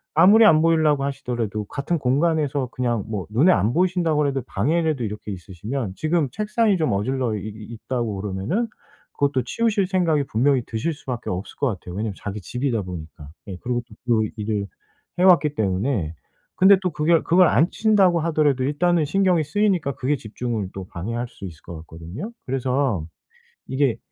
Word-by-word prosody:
아무리 200 +8 +7
안 155 -6 +6
보이려고 155 -4 +3
하시더라도 120 -6 -3
같은 140 - -2
공간에서 145 0 +1
그냥 120 -5 -1
뭐 105 -4 -4
눈에 140 +12 +4
안 110 - +2
보이신다고 175 -3 +1
그래도 140 -3 +1
방에라도 155 +4 0
이렇게 105 0 -6
있으시면 95 +5 -5
지금 155 -1 +1
책상이 215 -1 +1
좀 155 -7 0
어질러 115 +2 -1
이 - - -3
이 110 0 -9 0.2
있다고 120 -5 -2
그러면은 105 - -2 0.5
그것도 140 -3 0
치우실 210 - 0
생각이 170 -6 +1
분명히 130 +2 +2
드실 115 +9 -2
수밖에 125 -4 -6
없을 90 +3 -5
것 140 - +1
같아요 90 -5 -5
왜냐면 105 +1 -2
자기 105 +1 -5
집이다 125 +1 -2
보니까 80 -4 -9 0.2
예 95 - -5
그리고 120 -1 -1
또 110 - -15 0.3
그 110 - -1
일을 105 -1 -2 0.5
해 180 - +3
왔기 155 -6 +5
때문에. 100 - -1 0.4
근데 190 +1 +7
또 180 -2 -1
그결 155 +2 +2
그걸 175 +1 +5
안 155 +10 +3
치운다고 195 -6 +3
하더라도 150 -5 +1
일단은 155 +4 +2
신경이 180 0 +2
쓰이니까 185 -6 0
그게 135 +3 0
집중을 110 -3 -4
또 95 -1 -6
방해할 115 +8 -4
수 100 - -11
있을 80 -4 -10
것 85 - -8
같거든요? 85 - -8
그래서 130 - 0 0.6
이게 130 -4 0
135 Hz, 395 characters per minute, -23 LUFS, 110-165 Hz, 0.6 s, 아무리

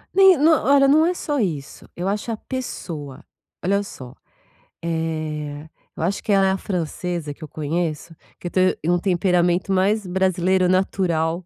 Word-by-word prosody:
Nem 385 -3 +7
no 310 +4 +5
olha, 280 -3 +4
não 310 +3 +5
é 355 - +2
só 295 -4 -2
isso. 155 - -3
Eu 180 +2 -3
acho 210 +3 -2
a 220 - -3
pessoa. 160 - -6 0.4
Olha 200 +2 +2
só. 130 -10 -9 0.7
Eh, 155 -2 -3 0.3
eu - - -5
acho 195 +4 -1
que 210 - -1
ela 195 -1 +4
é - - +3
a 190 - 0
francesa 175 -4 -3
que 150 - -13
eu - - -6
conheço 160 +2 -3 0.2
que - - -6
eu - - -6
tô 185 - +1 0.2
em 160 - 0
um 175 - +4
temperamento 180 0 +1
mais 200 +2 +1
brasileiro 185 0 +2
natural. 175 -2 0
180 Hz, 175 wpm, -22 LUFS, 160-200 Hz, 0.7 s, Nem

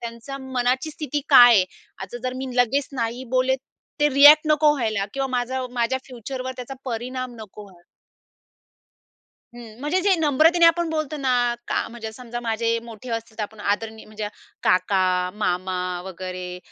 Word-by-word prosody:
त्यांच्या 235 +4 -7
मनाची 260 +2 -1
स्थिती 300 -1 -3
काय 245 -4 +9
आहे. 190 -4 +5 0.3
आता 190 +5 -7
जर 255 0 -2
मी 265 +1 -4
लगेच 255 +3 +2
नाही 240 0 -3
बोलले, 255 +1 +2 0.5
ते 295 - +5
रिएक्ट 295 +2 +8
नको 300 0 +5
व्हायला 220 -7 -1
किंवा 270 0 -1
माझं 255 +1 -2
माझ्या 245 +1 0
फ्युचरवर 255 +1 -6
त्याचा 250 +2 -7
परिणाम 255 +1 -4
नको 210 0 -10
व्हायला. 185 -4 -17 1.7
हं, 230 -2 -12
म्हणजे 300 +7 0
जे 390 +1 +3
नम्रतेने 320 +3 +4
आपण 335 0 +3
बोलतो 310 -1 -2
ना 270 -3 -1 0.4
का, - - 0
म्हणजे 225 -1 -7
समजा 240 +1 -7
माझे 230 -1 -1 0.2
मोठे 230 +1 -10
असतील, 230 -1 -5
तर - - -1
आपण 210 +1 -7
आदरणीय 220 +2 -2
म्हणजे 215 -1 -5 0.3
काका, 185 +1 +2 0.3
मामा 185 -2 -1 0.3
वगैरे 185 -1 -6
245 Hz, 155 wpm, -23 LUFS, 220-270 Hz, 1.7 s, काय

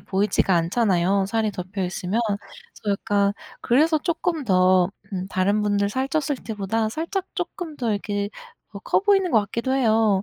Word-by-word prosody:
보이지가 195 -1 +1
않잖아요 190 +1 +2
살이 220 +1 0
덮여 185 +1 -4
있으면. 185 +4 -2 0.6
그래서 205 -2 0
약간 200 -2 +1 0.3
그래서 310 +6 +3
쪼끔 335 -1 -1
더 185 -3 +4 0.3
음 185 0 -3
다른 200 +3 +1
분들 205 -1 +1
살쪘을 270 +4 -2
때보다 215 +1 -1
살짝 335 - -3
쪼끔 325 -5 -5
더 240 -4 -1
이렇게 205 0 -2 0.4
어 - - -7
커 - - +1
보이는 390 -3 +3
것 220 - +5
같기도 235 +5 -3
해요. 220 -6 +3
210 Hz, 330 characters per minute, -23 LUFS, 195-265 Hz, 0.6 s, 것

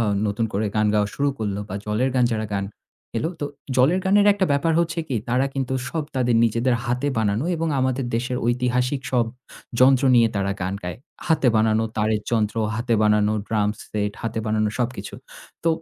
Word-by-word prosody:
আ - - +3 0.2
নতুন 105 +2 0
করে 105 +2 0
গান 105 0 +3
গাওয়া 105 -1 +2
শুরু 145 0 +1
করল, 105 -3 -2
বা 95 - -5
'জলের 110 +5 0
গান' 125 -2 +3
যারা 110 0 -1
গান 100 -1 -1 0.5
এলো, 155 - 0
তো - - -1 0.3
'জলের 140 +9 +4
গানে'র 200 +2 +4
একটা 195 -2 +1
ব্যাপার 150 +4 +2
হচ্ছে 170 0 -1
কি 130 - -1
তারা 125 +3 +2
কিন্তু 130 -1 -2
সব 160 +1 -2
তাদের 125 -2 +2
নিজেদের 115 +2 +1
হাতে 125 +3 -1
বানানো 110 +3 0
এবং 165 0 -1
আমাদের 130 0 0
দেশের 125 +2 -2
ঐতিহাসিক 125 +2 0
সব 120 -2 +3 0.5
যন্ত্র 130 +1 +5
নিয়ে 115 -2 +5
তারা 100 0 0
গান 95 +1 -2
গায়। 90 0 -5 0.3
হাতে 155 -6 +3
বানানো 110 0 +3
তারের 110 0 +1
যন্ত্র, 110 -2 0 0.2
হাতে 115 +1 0
বানানো 105 0 +3 0.2
ড্রাম 105 -2 +1
সেট, 105 -1 -3
হাতে 115 -1 -2
বানানো 110 0 +1
সবকিছু। 120 -5 -3 0.5
তো - - +3
120 Hz, 185 wpm, -23 LUFS, 105-130 Hz, 0.5 s, যন্ত্র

